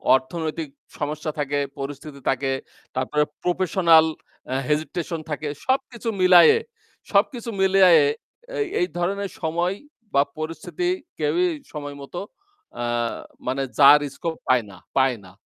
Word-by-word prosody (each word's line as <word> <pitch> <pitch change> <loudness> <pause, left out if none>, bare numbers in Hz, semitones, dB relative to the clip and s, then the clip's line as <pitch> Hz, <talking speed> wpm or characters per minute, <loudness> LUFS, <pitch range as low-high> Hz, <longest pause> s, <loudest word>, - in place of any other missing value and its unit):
অর্থনৈতিক 155 +3 -3 0.3
সমস্যা 155 +1 -3
থাকে, 145 0 0 0.2
পরিস্থিতি 140 +1 -7
থাকে, 135 +1 0 0.4
তারপরে 130 +3 +1 0.2
professional 175 -2 +4 0.5
আ - - 0
hesitation 160 +2 -1
থাকে। 150 0 -3 0.2
সবকিছু 260 -3 -1
মিলাইয়ে 185 - +8 0.5
সবকিছু 230 +4 +1
মিলাইয়ে 185 -5 +6 0.4
অ্যা - - -5 0.2
এই 355 - +2
ধরনের 195 +3 -1
সময় 170 +3 0 0.4
বা 140 - +5 0.2
পরিস্থিতি 165 - -3 0.3
কেউই 360 +1 +2 0.3
সময় 145 -2 -6
মতো 155 +5 -7 0.6
আ - - -1 0.6
মানে 135 +1 0 0.2
যার 145 +1 +9 0.2
scope 165 -1 -4
পায় 125 -2 +4
না 95 - -13 0.2
পায় 130 -2 +3
না। 95 - -14
160 Hz, 120 wpm, -23 LUFS, 145-185 Hz, 0.6 s, যার